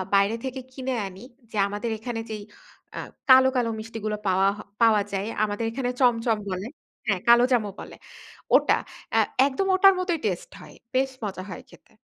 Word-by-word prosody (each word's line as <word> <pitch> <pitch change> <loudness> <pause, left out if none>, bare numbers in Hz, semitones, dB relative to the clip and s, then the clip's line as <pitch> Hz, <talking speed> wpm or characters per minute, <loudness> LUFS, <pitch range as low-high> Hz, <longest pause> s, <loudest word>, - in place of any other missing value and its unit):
বাইরে 200 +3 +3
থেকে 260 0 -4
কিনে 260 -1 -3
আনি, 190 +2 -11 0.3
যে 215 - -5
আমাদের 210 +3 -3
এখানে 230 -1 -4
যেই 210 -1 -5 0.5
আ - - -3 0.3
কালো, 260 0 +8
কালো 235 -2 +1
মিষ্টিগুলা 215 -1 -4
পাওয়া 190 +1 +3
হ - - -11 0.2
পাওয়া 220 -3 +5
যায়, 195 +2 -1 0.2
আমাদের 210 +2 -1
এখানে 250 0 -2
চমচম 230 -2 +3
বলে 185 +4 -4 0.4
হ্যাঁ, 195 -3 +1
কালোজামও 240 -3 +5
বলে। - - -9 0.6
ওটা - - +4 0.4
আ - - +6 0.3
একদম 285 +8 -1
ওটার 390 +1 +7
মতই 360 -3 0
টেস্ট 185 -4 -2
হয়। - - -13 0.2
বেশ 265 0 +2
মজা 190 -3 -4
হয় 180 - -8
খেতে। - - -20
225 Hz, 170 wpm, -25 LUFS, 205-255 Hz, 0.6 s, কালো